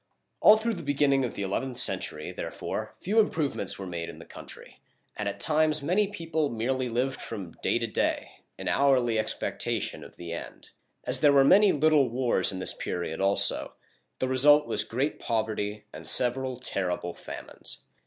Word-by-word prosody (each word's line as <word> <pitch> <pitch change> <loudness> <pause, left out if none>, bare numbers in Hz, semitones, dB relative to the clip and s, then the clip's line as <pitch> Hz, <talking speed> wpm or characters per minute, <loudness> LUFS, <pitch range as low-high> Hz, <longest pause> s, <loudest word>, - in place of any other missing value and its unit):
All 215 - +7
through 230 +1 -1
the 175 - -6
beginning 140 -2 +2
of 125 - -3
the 100 - -3
eleventh 120 +6 -3
century, 125 - 0
therefore, - - -5
few 210 +5 +1
improvements 160 -9 0
were 95 - -6
made 85 -2 -5
in - - -10
the - - -12
country, - - -13 0.4
and 105 -1 -2
at 100 0 -7
times 155 +3 +3
many 190 +7 +2
people 165 -6 -2
merely 125 +3 -2
lived 130 +3 -1
from 100 -7 -7
day - - +1
to 120 - -1
day, 110 - -1 0.3
in - - -6
hourly 125 -5 +2
expectation 110 - -2
of - - -13
the 85 -1 -7
end. 85 - -9 0.3
As 125 +1 +3
there 145 +1 +5
were 140 -1 +6
many 195 +7 +6
little 150 -3 +3
wars 120 -6 +1
in 95 - -6
this 95 - +1
period 85 -1 -4
also, 100 +1 +1 0.4
the 130 - -1
result 145 +3 +5
was - - -1
great 135 +6 -2
poverty 110 -2 -2
and - - -7
several 130 +1 +2
terrible 90 -7 -3
famines. - - -7
130 Hz, 175 wpm, -27 LUFS, 105-150 Hz, 0.4 s, All